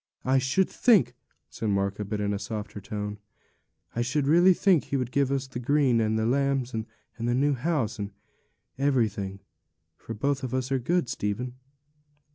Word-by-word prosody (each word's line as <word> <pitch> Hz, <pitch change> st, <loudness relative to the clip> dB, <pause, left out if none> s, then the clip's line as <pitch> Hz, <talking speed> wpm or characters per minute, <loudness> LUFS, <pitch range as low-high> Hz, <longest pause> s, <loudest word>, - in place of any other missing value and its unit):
'I 130 Hz, +1 st, +4 dB
should 135 Hz, +9 st, +2 dB
think,' 190 Hz, -, +4 dB, 0.3 s
said 110 Hz, -, -4 dB
Martha, 100 Hz, +1 st, 0 dB
but 105 Hz, +1 st, -3 dB
in 105 Hz, 0 st, 0 dB
a 100 Hz, -, -2 dB
softer 105 Hz, 0 st, -5 dB
tone, 105 Hz, +1 st, -5 dB, 0.8 s
'I 120 Hz, -, 0 dB
should 135 Hz, +4 st, 0 dB
really 175 Hz, +5 st, +6 dB
think 185 Hz, -6 st, +3 dB
He 140 Hz, -, -1 dB
would 125 Hz, -2 st, -2 dB
give 140 Hz, -1 st, +1 dB
us 135 Hz, -1 st, 0 dB
the 130 Hz, -2 st, -6 dB
green, 130 Hz, -2 st, +3 dB
and 110 Hz, 0 st, +1 dB
the 110 Hz, -, 0 dB
lambs, 135 Hz, 0 st, +1 dB
and 110 Hz, 0 st, -3 dB, 0.3 s
the 120 Hz, +1 st, 0 dB
new 145 Hz, +3 st, +3 dB
house, 130 Hz, -5 st, -1 dB
and 100 Hz, -1 st, -3 dB, 0.7 s
everything; 105 Hz, -8 st, 0 dB, 0.5 s
for 115 Hz, -, -8 dB
both 140 Hz, +6 st, 0 dB
of 130 Hz, 0 st, -2 dB
us 130 Hz, +1 st, -2 dB
are 135 Hz, -, +2 dB
good, 170 Hz, +4 st, +1 dB
Stephen.' 115 Hz, +4 st, -3 dB
125 Hz, 175 wpm, -27 LUFS, 105-140 Hz, 0.8 s, really